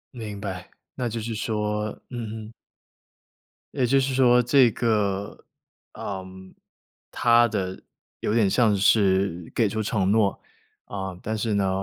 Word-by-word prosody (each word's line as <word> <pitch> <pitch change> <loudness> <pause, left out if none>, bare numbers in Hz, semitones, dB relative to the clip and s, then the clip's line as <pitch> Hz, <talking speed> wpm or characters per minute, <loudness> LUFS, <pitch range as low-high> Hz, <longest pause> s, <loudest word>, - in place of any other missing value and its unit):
明 105 -3 -6
白， 95 -2 -6 0.2
那 125 -3 -3
就 115 - -4
是 115 +1 -4
说 105 -1 -2 0.2
嗯 110 -2 -6
嗯。 115 - -13 1.2
也 130 -4 +1
就 135 +2 +4
是 135 0 0
说 125 -1 +5
这 125 0 +5
个， 105 -4 -1 0.5
嗯。 95 -1 -8 0.6
他 120 0 +5
的 95 -4 -3 0.4
有 105 - 0
点 110 -4 +3
像 110 -2 +3
是 95 -4 +2
给 110 -4 +2
出 110 +1 -2
承 100 -2 0
诺， 105 -2 +2 0.4
啊， 95 -2 -5
但 110 +1 -3
是 110 0 -1
呢， 100 -1 +1
105 Hz, 145 characters per minute, -25 LUFS, 100-115 Hz, 1.2 s, 说